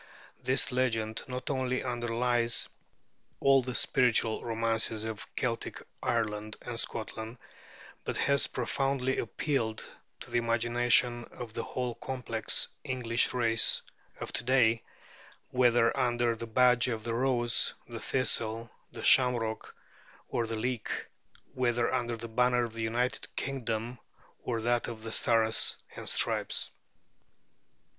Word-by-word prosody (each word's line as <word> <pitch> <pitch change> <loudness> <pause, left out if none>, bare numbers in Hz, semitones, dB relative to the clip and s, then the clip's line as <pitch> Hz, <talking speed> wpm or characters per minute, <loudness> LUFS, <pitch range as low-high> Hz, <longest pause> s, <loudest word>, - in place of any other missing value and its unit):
This 130 +1 +1
legend 115 -3 0
not 125 +1 -4
only 130 -1 -1
underlies 120 -1 +1 0.7
all 135 -1 +5
the 125 0 -5
spiritual 120 -4 +3
romances 115 -1 +1
of 110 0 -5
Celtic 115 -2 -2 0.2
Ireland 110 -2 -1
and 120 -1 -5
Scotland, 110 +1 -5 0.7
but - - -3
has 140 -1 +2
profoundly 130 +1 -1
appealed 115 -2 -2 0.3
to - - -10
the 120 - +2
imagination 120 +1 +2
of 115 -3 -9
the 115 - -2
whole 125 +1 -3
complex 115 -3 0 0.2
English 120 -2 0
race 115 -3 +3 0.4
of - - -6
to - - 0
day, 120 -3 +3 0.7
whether 120 -2 +4
under 120 -3 +1
the 115 +1 -6
badge 125 +1 +4
of 115 -3 -3
the 115 - -2
rose, 120 -1 +2
the 115 -1 -7
thistle, 115 -3 0 0.2
the - - -7
shamrock, 120 -4 +3 0.5
or 115 -1 -1
the 115 0 -3
leek, 120 +1 -2 0.6
whether 120 -2 +1
under 120 -1 -1
the 115 - -6
banner 125 +1 +2
of 115 -2 -4
the 115 - -5
United 120 +3 -1
Kingdom 120 -3 -3 0.4
or 115 -2 -2
that 120 0 +1
of 110 -2 -7
the 115 - -5
Stars 110 -1 +3 0.2
and - - -4
Stripes. - - +1
120 Hz, 125 wpm, -30 LUFS, 115-125 Hz, 0.7 s, all